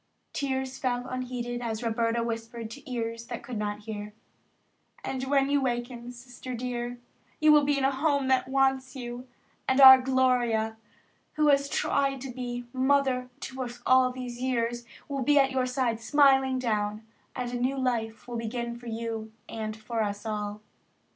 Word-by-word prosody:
Tears 265 -1 -2
fell 245 -1 -1
unheeded 245 -1 -4
as 225 -1 -3
Roberta 230 0 0
whispered 230 0 -5
to 280 +1 -10
ears 230 -1 -3
that 240 - -6
could 245 -5 -5
not 210 0 -3
hear: 210 -1 -7 0.9
"And 265 0 -3
when 275 -1 +3
you 285 0 +2
waken, 240 -1 -3
Sister 245 +1 -8
dear, 245 0 -4 0.4
you 310 0 +6
will 300 -1 +7
be 285 0 +2
in 275 - 0
a 270 - +4
home 280 0 +1
that 260 -1 +2
wants 265 0 +1
you, 245 0 -6 0.4
and 260 +1 +2
our 265 -1 +11
Gloria, 250 -4 +2 0.6
who 305 -1 +3
has 280 0 +3
tried 275 -1 +1
to 270 -1 -5
be 245 -1 -5
Mother 260 -1 +2
to 265 0 -5
us 245 -1 -5
all 255 0 +5
these 250 -1 -7
years 240 -2 -1 0.2
will 275 -2 -3
be 290 +3 +3
at 270 -1 +5
your 260 -1 +1
side 250 -3 0
smiling 265 +1 +4
down, 215 -3 -1 0.3
and 250 -1 -3
a - - -3
new 260 +3 0
life 230 -4 -2
will 240 -1 -4
begin 235 +1 -3
for 240 - -11
you 225 -1 -4 0.2
and 215 -1 -5
for 225 +1 -3
us 205 0 -3
all." 210 -1 -3
250 Hz, 170 wpm, -28 LUFS, 230-265 Hz, 0.9 s, our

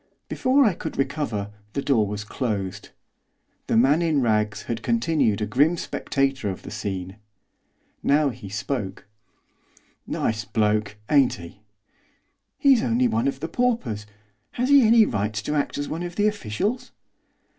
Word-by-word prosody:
Before 270 +2 +3
I 210 - +3
could - - -6
recover 135 -8 -2 0.2
the 140 - -1
door 115 -7 +2
was 105 +1 -4
closed. 105 -4 -3 0.8
The - - +2
man 140 +7 +4
in 160 -4 +2
rags 110 -3 +1
had 115 -1 -4
continued 160 - +1
a - - +1
grim 150 +9 +2
spectator 135 -8 -1
of 95 - -6
the - - -8
scene. 95 -2 -5 0.8
Now 145 0 +3
he 120 -6 -9
spoke. 105 0 -4 1.0
'Nice 110 -1 -1
bloke, 105 0 0 0.2
ain't 140 -4 +5
he?' 85 +3 -12 1.0
'He's 275 -5 +5
only 120 +1 +2
one 115 +3 0
of 135 0 -2
the 160 - -2
paupers, 165 - -1 0.5
has 250 +2 -1
he 285 -1 +8
any 225 -1 +6
right 105 - -2
to 110 +7 -2
act 145 -1 -1
as 145 0 -3
one 165 +2 -4
of 175 0 -5
the 205 - +2
officials? 210 - -1
125 Hz, 150 wpm, -24 LUFS, 105-160 Hz, 1.0 s, he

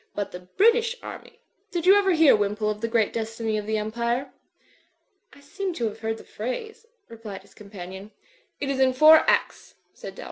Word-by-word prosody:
But 205 - -3
the 180 - -8
British 455 - +2
army 460 - -10 0.2
—. 405 +1 -46
Did 345 -1 -3
you 380 - +8
ever 400 -2 +3
hear, 320 -6 +6
Wimpole, 210 +1 -1
of 210 0 -7
the 230 - -1
great 225 -2 +1
destiny 225 -1 -3
of 210 - -8
the 220 0 0
Empire?" 235 +5 -2 1.0
"I 285 - -18
seem 370 +6 -5
to 240 - -2
have 215 0 -4
heard 225 0 -3
the - - -13
phrase/' 440 - -6 0.2
replied 215 -4 -9
his - - -22
com 205 -1 -14
panion. 190 +1 -9 0.5
"It 275 -1 -2
is 270 - -2
in 260 -1 +3
four 310 +4 +8
acts," - - -1 0.2
said - - -10
Dalroy. - - -14
230 Hz, 205 wpm, -25 LUFS, 210-320 Hz, 1.0 s, you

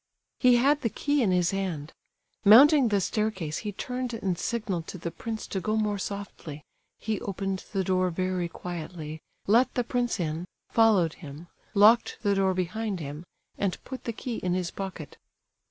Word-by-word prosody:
He 250 -2 +6
had 280 +5 +3
the 230 - 0
key 285 +5 0
in 220 - +2
his 180 -1 +2
hand. 180 -6 -3 0.5
Mounting 265 +6 +8
the 205 -2 +2
staircase 190 -6 -1
he 210 - -4
turned 250 +3 -4
and 195 -5 -1
signalled 190 -3 -3
to - - -6
the 170 0 -5
prince 220 +6 -5
to 190 - -3
go 215 +2 0
more 210 -2 0
softly; 190 -7 -6 0.3
he 215 -3 -3
opened 195 -1 -3
the 195 -2 0
door 185 0 +1
very 185 0 -1
quietly, 160 -3 -7 0.2
let 235 +5 +4
the 245 - +1
prince 245 -1 -1
in, 165 0 -2 0.3
followed 205 -8 +4
him, 155 +2 -10 0.3
locked 215 +4 +5
the 205 -2 +3
door 190 -1 +2
behind 195 +2 -2
him, 150 +1 -6 0.4
and 195 -2 0
put 260 -1 -8
the 235 - -1
key 230 +1 -5
in 180 -1 -1
his 180 -2 -2
pocket. 190 -6 -7
195 Hz, 170 wpm, -27 LUFS, 175-225 Hz, 0.5 s, Mounting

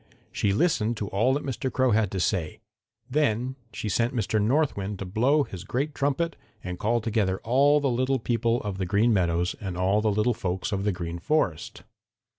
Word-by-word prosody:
She 100 - 0
listened 120 - +1
to 100 -3 -4
all 115 +7 +2
that 145 - -2
Mr. 130 -1 -3
Crow 130 0 +2
had 110 -2 +2
to 95 - -3
say. 90 -3 -1 0.5
Then 130 -3 0 0.2
she - - -5
sent 115 +5 0
Mr. 110 -1 0
North 140 +8 +2
Wind 100 0 -4
to 95 - -5
blow 125 +10 +2
his 95 -8 -8
great 140 +8 -2
trumpet 145 +5 -1 0.3
and 90 -1 -5
call 115 +2 +1
together 105 -4 0
all 140 +5 +4
the 140 - 0
little 130 +2 +1
people 115 0 0
of 100 -2 -4
the 95 - -1
Green 105 +5 +3
Meadows 90 -2 +1
and 95 -3 -4
all 95 +3 +2
the 110 - +2
little 105 +4 +2
folks 95 -1 -3
of 100 0 -1
the 105 - +2
Green 85 -1 -5
Forest. 95 - -1
110 Hz, 200 wpm, -26 LUFS, 95-130 Hz, 0.5 s, all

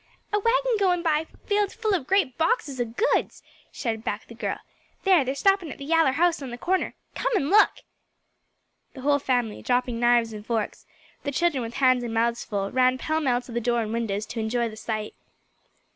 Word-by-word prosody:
"A 415 - +3
wagon 475 +2 +2
goin' 360 -3 +2
by 320 -1 +1 0.2
filled 410 -1 +1
full 455 -2 -1
of 330 -9 -1
great 375 -10 +2
boxes 320 - 0
o' - - +1
goods," 235 - 0 0.3
shouted 225 -4 -3
back - - -3
the - - -12
girl. - - -3 0.5
"There 370 -7 +5
they're 265 +1 -2
stoppin' 390 -1 +2
at - - -8
the 280 - -8
yaller 325 -3 +3
house 335 +1 +2
on 270 - -5
the 240 - -6
corner. 370 +8 -1 0.2
Come - - -1
and 285 -7 +1
look." 420 +1 +5 1.1
The 265 - -8
whole 285 +1 +3
family, 245 -5 -1
dropping 245 -1 0
knives 240 -1 +3
and 210 -1 -8
forks, 225 -1 -3 0.3
the 285 - -3
children 300 -2 +1
with 230 0 -6
hands 255 -2 +3
and 230 -1 -4
mouths 235 +1 +1
full, 200 -2 -3
ran 255 0 +3
pell 315 +4 -1
mell 250 -4 +1
to 235 -1 -4
door 235 0 +1
and 215 0 -4
windows 215 -3 -2
to 235 - -6
enjoy 230 +1 0
the 215 - -10
sight. 215 -1 -4
260 Hz, 200 wpm, -25 LUFS, 235-345 Hz, 1.1 s, There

